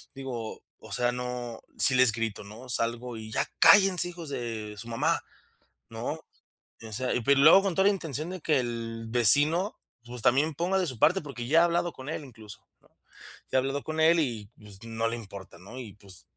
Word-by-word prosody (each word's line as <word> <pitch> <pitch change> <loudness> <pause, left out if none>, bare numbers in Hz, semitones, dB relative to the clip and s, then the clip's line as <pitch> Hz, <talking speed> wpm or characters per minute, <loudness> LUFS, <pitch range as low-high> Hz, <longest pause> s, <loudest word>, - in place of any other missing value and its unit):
Digo, 125 -5 -7 0.2
o - - -14
sea, 120 0 +1
no, 125 -2 -6 0.2
sí 130 - +6
les 125 -2 +5
grito, 115 -2 -4
¿no? 110 +5 -12
Salgo 120 0 -1
y 110 0 -9
ya - - 0
cállense, 190 -3 +6
hijos 170 -3 -8
de 115 -5 -5
su 110 +3 -8
mamá, 115 - 0 0.7
¿no? - - -5 0.6
O 110 -1 -10
sea, 125 +4 -1
y 125 - -1
luego 155 +8 +7
con 195 -3 -1
toda 190 +2 +2
la 205 - +2
intención 160 -4 -4
de 185 -1 -7
que 155 -3 +2
el 115 -2 -5
vecino, 145 - +4 0.3
pues, 120 0 -7
también 140 +7 +2
ponga 180 +6 0
de 185 - 0
su 130 -7 -5
parte, 165 - +3
porque 125 -5 -7
ya 160 +6 +4
ha - - +5
hablado 175 0 0
con 130 +2 -10
él 160 - -5
incluso, 110 -6 -13 0.2
¿no? - - -28 0.6
Ya - - +3
ha - - +4
hablado 135 +1 -3
con 155 0 -4
él 165 +1 +4
y, 115 -8 -3
pues, 105 -1 -5
no 115 0 -3
le 115 - -3
importa, 100 -6 -11
¿no? 100 +8 -11
Y 115 -6 -8
pues 100 -3 -11
125 Hz, 205 wpm, -27 LUFS, 115-155 Hz, 0.7 s, luego